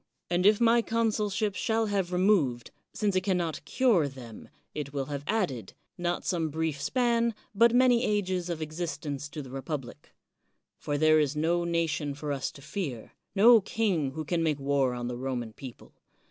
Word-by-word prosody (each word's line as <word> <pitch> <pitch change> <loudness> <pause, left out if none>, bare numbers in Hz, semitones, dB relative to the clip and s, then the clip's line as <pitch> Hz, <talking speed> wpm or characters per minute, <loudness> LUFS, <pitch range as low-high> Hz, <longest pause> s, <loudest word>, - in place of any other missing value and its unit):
And 180 +2 +3
if 210 0 +5
my 235 0 +4
consulship 215 -2 0
shall 225 +2 0
have 195 -4 -1
removed, 180 - +2 0.2
since 205 -3 -1
it 185 - +3
can 185 -1 +1
not 165 -4 -3
cure 210 - +3
them, 125 -5 -11 0.2
it 145 -2 -5
will 140 -2 -2
have 140 0 -4
added, 180 - -1 0.2
not 175 0 -2
some 170 -4 0
brief 155 -1 -2
span, 235 - +1 0.2
but 230 +3 +5
many 245 -1 +5
ages 185 -5 -1
of 165 -2 -3
existence 155 -3 -5
to 150 0 -6
the 130 - -11
republic. 135 -1 -6 0.7
For 145 - -2
there 155 +1 +5
is 150 -1 0
no 170 +3 +1
nation 165 -4 -1
for 145 0 -4
us 135 -2 -2
to 140 - -14
fear, 140 - -5
— - - -52
^no 225 +1 +7
king 185 -12 0
who 155 +1 -5
can 170 +2 0
make 155 -3 +1
war 135 -2 +1
on 120 0 -4
the 120 0 -4
Roman 125 -3 -4
people. 130 -1 -11
165 Hz, 180 wpm, -28 LUFS, 140-205 Hz, 0.7 s, ^no